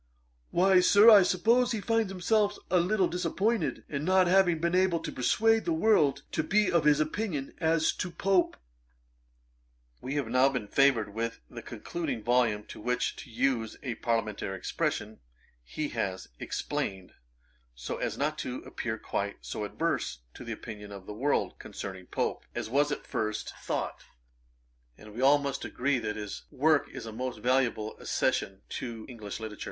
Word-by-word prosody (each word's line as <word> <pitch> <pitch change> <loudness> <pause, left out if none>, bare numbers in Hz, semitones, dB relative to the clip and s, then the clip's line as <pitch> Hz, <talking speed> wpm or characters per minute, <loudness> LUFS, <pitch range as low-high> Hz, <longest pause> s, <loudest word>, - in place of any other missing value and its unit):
'Why, 185 +1 +5
Sir, 205 +5 +7
I 205 -2 +9
suppose 230 +8 +3
he 220 - -1
finds 225 -1 0
himself 205 +2 +1
a 180 - +5
little 185 +1 +2
disappointed, 180 +3 -1
in 140 0 -3
not 185 +2 +4
having 180 -2 +4
been 170 +2 0
able 185 -2 +3
to - - -5
persuade 225 - +2
the 335 - 0
world 155 - +3
to - - 0
be 205 +5 +2
of 170 -3 +2
his 150 -1 +5
opinion 155 -2 -2
as 160 0 +2
to 185 - -2
Pope.' 190 +1 +1 1.4
We 130 +3 -4
have 140 -5 -1
now 130 +3 +4
been 125 -6 -3
favoured 120 -5 +3
with 115 +1 -3
the - - -7
concluding 145 -10 -4
volume, 120 -3 +2
in - - -11
which, 125 0 0
to - - -10
use 115 -1 0
a 125 -4 -2
parliamentary 110 -4 -2
expression, 105 +3 -2 0.4
he 145 - -4
has 95 -5 -3
explained, 95 -1 -3 0.6
so - - -5
as - - -3
not 155 +2 -1
to 130 -3 -4
appear 110 -2 -4
quite 100 -2 -3
so 105 - -4
adverse 60 -10 -2
to - - -10
the - - -6
opinion 105 -3 -8
of 100 -2 -9
the 105 - -7
world, 135 +7 0
concerning 95 -2 -7
Pope, - - -2
as 115 -2 -4
was 145 +2 +3
at - - -4
first 110 0 -3
thought; - - -4 0.9
and 105 0 -13
we 115 - -7
must 140 +1 +3
all - - -5
agree 130 +1 0
that 105 -2 -3
his 105 -2 -6
work 150 +2 +2
is - - -8
a 110 - -6
most 125 +2 -4
valuable 120 -2 +1
accession 95 0 -1
to 115 -3 -5
English 110 -5 -7
literature. 110 -2 -7
135 Hz, 170 wpm, -29 LUFS, 110-180 Hz, 1.4 s, I